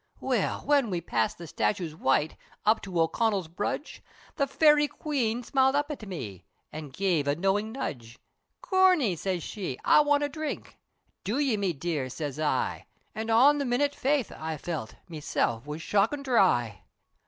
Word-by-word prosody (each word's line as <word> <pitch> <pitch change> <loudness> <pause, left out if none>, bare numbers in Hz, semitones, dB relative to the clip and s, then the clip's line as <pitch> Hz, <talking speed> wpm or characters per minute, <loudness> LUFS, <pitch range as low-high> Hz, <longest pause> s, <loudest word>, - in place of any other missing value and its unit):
Well, - - 0
whin 285 -5 +2
we 180 -3 -1
passed 115 -9 -1
the 170 - -8
statutes 170 +1 -1
white, 150 0 +1 0.3
Up 220 +1 +4
to 185 -3 -3
O'Connell 195 +2 +1
Brudge, 200 - -4 0.3
The 280 -3 +1
Fairy 295 +1 +4
Queen 250 -7 -2
smiled 265 +2 +2
up 290 +1 0
at 230 -8 -7
me, 110 - -7 0.3
An' 155 -1 -7
gev 165 -1 0
a 145 - +2
knowin' 195 +5 0
nudge, 120 - -6 0.4
"Corney!" 365 - +3
siz 180 0 -2
she, 180 -11 -5
"I - - +6
want 290 0 +2
a 290 - 0
dhrink!" 310 +1 -6 0.4
"Do 220 +6 -1
ye 280 -6 +2
me 195 -4 0
dear?" 145 -3 -3
siz 145 +1 -5
I, 150 -4 -1 0.3
An' 220 +1 -4
on 270 +6 +5
the - - 0
minute 275 +3 +1
faith 275 -4 0
I 160 0 -4
felt, 150 -7 -5
Meself 145 -6 -2
was 150 +2 -5
shockin' 220 +8 +1
dhry. 125 - +2
200 Hz, 165 wpm, -28 LUFS, -, 0.4 s, I